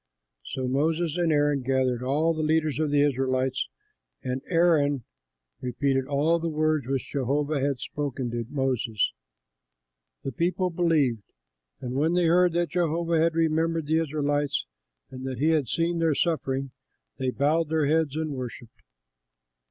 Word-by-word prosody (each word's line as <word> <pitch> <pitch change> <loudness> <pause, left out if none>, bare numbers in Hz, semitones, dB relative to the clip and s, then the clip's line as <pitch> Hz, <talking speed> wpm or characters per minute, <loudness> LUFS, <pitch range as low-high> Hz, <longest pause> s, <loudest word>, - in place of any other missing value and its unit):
So 130 -2 -4
Moses 160 +4 0
and 175 -2 +1
Aaron 145 -2 +2
gathered 130 -1 0
all 150 +6 +1
the 155 - -3
leaders 155 -1 +1
of 155 -1 +1
the 145 0 +3
Israelites, 130 -1 0 0.6
and 130 +1 -2
Aaron 155 -6 +3 0.6
repeated 130 +1 0
all 150 +4 +2
the 165 0 -2
words 155 -3 0
which 135 -2 -2
Jehovah 140 +2 0
had 140 0 0
spoken 135 -4 -4
to 120 0 -2
Moses. 130 -6 0 1.1
The 135 - -3
people 180 +6 0
believed; 155 - +2 0.6
and 125 0 -4
when 155 +5 +1
they 180 -1 +3
heard 175 +1 +4
that 175 -1 0
Jehovah 170 -1 +1
had 165 0 +2
remembered 165 0 +1
the 160 +2 +2
Israelites 145 - 0 0.5
and 130 0 -8
that 130 -2 -4
he 150 +6 +2
had 155 -5 +2
seen 170 +6 0
their 165 -3 +2
suffering, 135 -5 -1 0.5
they 130 - 0
bowed 150 +4 +1
their 160 -2 +1
heads 155 -1 +1
and 155 -1 -2
worshipped. 125 -3 -7
145 Hz, 150 wpm, -26 LUFS, 135-165 Hz, 1.1 s, heard